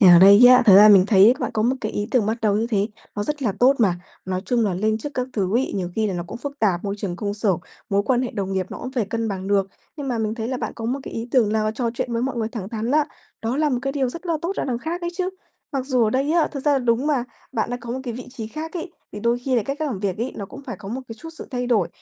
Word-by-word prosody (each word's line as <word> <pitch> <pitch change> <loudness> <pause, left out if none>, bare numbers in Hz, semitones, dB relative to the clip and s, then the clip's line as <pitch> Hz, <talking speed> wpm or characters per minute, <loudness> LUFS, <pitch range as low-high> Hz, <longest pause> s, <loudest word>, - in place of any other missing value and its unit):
thì 195 - +7
ở 175 -1 +9
đây 200 +6 +9
á, 250 0 +8
thật 195 - +9
ra 210 +2 +9
mình 195 -2 +7
thấy 210 +3 +6
bạn - - -1
có 215 - +1
một 255 +3 +2
cái 215 - -3
ý 205 +1 -2
tưởng 240 -5 +2
bắt 220 +2 -1
đầu 205 -1 +3
như 225 +2 0
thế 205 -3 +1 0.3
nó 205 - -2
rất 295 -2 -3
là 215 - +1
tốt 265 +3 +6
mà. 185 -7 +2 0.2
Nói 185 0 -2
chung 235 0 +1
là 195 -4 0
lên 215 +3 0
chức 290 +5 -7
các 250 -1 -1
thứ 200 +1 0
ấy, 265 - 0
nhiều 180 -3 -2
khi 220 -1 +1
là 195 - -2
nó 175 - -2
cũng 195 - -7
phức 285 +2 -6
tạp, 190 -6 +1
môi 200 0 -2
trường 190 -4 -4
công 205 -1 -3
sở, 210 -2 +1 0.4
mối 200 0 +2
quan 255 -1 +2
hệ 250 - -2
đồng 195 -3 -3
nghiệp 190 -1 -1
nó - - -6
cũng 255 +1 -6
phải 240 -5 0
cân 225 +1 -2
bằng 190 -2 -4
được. 200 -1 +2 0.3
Nhưng 285 -3 -5
mà 240 -3 -1
mình 215 0 -1
thấy 230 0 -4
là 260 - -2
bạn - - -4
có 225 - -7
một 255 +5 -1
cái - - -8
ý 230 +2 -4
tưởng 225 -6 +3
là 215 0 +1
trò 240 -1 -1
chuyện 240 0 -3
với 230 +1 0
mọi 265 -1 -2
người 225 -1 -1
thẳng 210 -5 -6
thắn 225 +1 -3
á, 300 +1 +4 0.4
đó 235 +4 -1
là 305 0 +2
một 250 - +1
cái 275 0 -1
điều 270 -3 0
rất 335 +8 -8
là 340 - 0
tốt 345 - -1
là - - -1
đằng 245 -3 -2
khác 330 +7 -4
ấy 345 0 -3
chứ. 370 0 -1 0.4
Mặc 265 -1 -2
dù 250 -4 +2
ở 215 - +1
đây 275 +5 +1
á, 335 -2 +3
thực 275 - -4
ra 290 +1 +2
là 275 - +3
đúng 245 +2 +1
mà, 275 -5 +1 0.3
bạn 225 - -1
đã 245 - -1
có 235 - -7
một 260 - -3
cái 240 -3 -5
vị 250 - -8
trí 235 -4 -6
khác 310 +8 -6
ấy, 345 0 -5 0.2
thì 210 - -6
đôi 235 +2 +1
khi 255 +1 -1
là 225 - +2
cái 275 +4 -3
cách 310 0 -2
làm 225 -8 -3
việc 195 -1 -2
ấy 240 +3 -2
nó 200 - -5
cũng 275 +8 -11
phải 240 - -5
có 195 - -9
một 245 +5 -4
cái 225 - -6
chút 325 - -9
sự - - -7
thay 250 -2 -2
đổi. 215 -8 +2
230 Hz, 340 wpm, -22 LUFS, 205-265 Hz, 0.4 s, ở